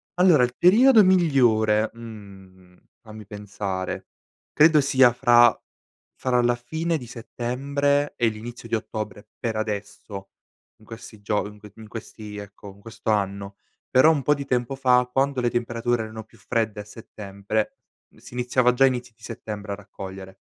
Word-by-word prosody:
allora 180 -7 +5
il 125 0 -1
periodo 220 +5 +6
migliore, 120 -12 +3
mhmm, 95 -5 -13 0.2
fammi 110 -2 -12
pensare, 100 -2 -5 0.4
credo 155 -1 +5
sia 130 -3 +4
fra 120 -1 +5 0.6
fra 125 -1 +1
la 120 0 +2
fine 160 +7 -2
di 125 - -9
settembre 140 +5 -1
e 120 - +2
l'inizio 115 +2 -6
di 115 - -11
ottobre, 105 -1 -6
per 115 -2 -2
adesso 105 -2 -5 0.5
in 110 - -21
questi 115 -2 -11
gio 105 0 -1
in 105 0 -13
q 105 -1 -14
in 110 -1 -12
questi 105 -1 -9
ecco 100 -1 -10
in 100 - -20
questo 110 0 -4
anno, 100 -1 -2 0.3
però 130 +5 +6
un 145 -4 -1
po' 150 - +4
di 140 -1 -5
tempo 125 0 -1
fa, 125 -2 +3
quando 135 -1 +1
le 120 - +1
temperature 120 -1 -1
erano 110 0 -8
più 115 +1 -23
fredde 110 -1 -2
a - - -9
settembre, 105 -1 -5 0.4
si - - -15
iniziava 125 0 +2
già 135 +2 +3
a - - +6
inizio 125 -2 -3
di 115 - -25
settembre, 105 -3 -7
a - - -3
raccogliere. 95 -1 -10
115 Hz, 160 wpm, -24 LUFS, 105-125 Hz, 0.6 s, periodo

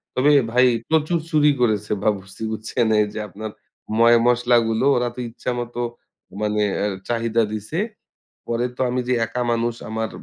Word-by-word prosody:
তবে 135 +4 +4 0.2
ভাই 125 +2 +5 0.2
প্রচুর 160 +2 +2
চুরি 150 -2 +4
করেছে 105 -3 +1
বাবুর্চি, 95 -2 -2
বুঝছেন? 110 +2 -1
এই 105 - +4
যে - - -4
আপনার 110 +2 -7 0.5
ময়-মশলা 120 +1 +5
গুলো 115 +3 0
ওরা 125 0 +1
তো - - -8
ইচ্ছা 120 +2 -4
মতো 120 0 -5 0.6
মানে 105 0 0 0.2
এ - - +1 0.2
চাহিদা 115 -1 +1
দিছে। 110 +9 -5 0.7
পরে 120 +1 0
তো - - -2
আমি 125 +1 0
যে 125 - +2
একা 125 +3 -4
মানুষ, 115 0 0
আমার 110 0 -2
115 Hz, 160 wpm, -22 LUFS, 110-125 Hz, 0.7 s, ভাই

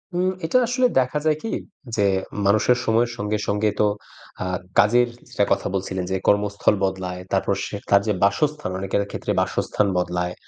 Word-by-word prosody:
উম 180 +1 +2 0.2
এটা 255 - +2
আসলে 250 +1 +2
দেখা 130 +3 0
যায় 155 -1 +3
কি 225 - -3 0.4
যে 100 -2 +2 0.4
মানুষের 110 +5 +4
সময়ের 115 +2 +2
সঙ্গে 105 +1 -1
সঙ্গে 105 +1 +1
তো 105 - +4 0.6
আ - - -3 0.3
কাজের 120 +4 +5 0.2
যেটার 120 -5 0
কথা - - -2
বলছিলেন 95 -1 -2
যে - - +1
কর্মস্থল 100 0 +2
বদলায়, 95 -1 -2
তারপর 95 +1 +2
সে - - -6 0.2
কাজে 100 +2 +4
বাসস্থান 150 +5 +1
অনেকের 100 +1 0
ক্ষেত্রে - - -3
বাসস্থান 105 - 0
বদলায়। 90 0 -1
105 Hz, 160 wpm, -23 LUFS, 95-125 Hz, 0.6 s, কাজের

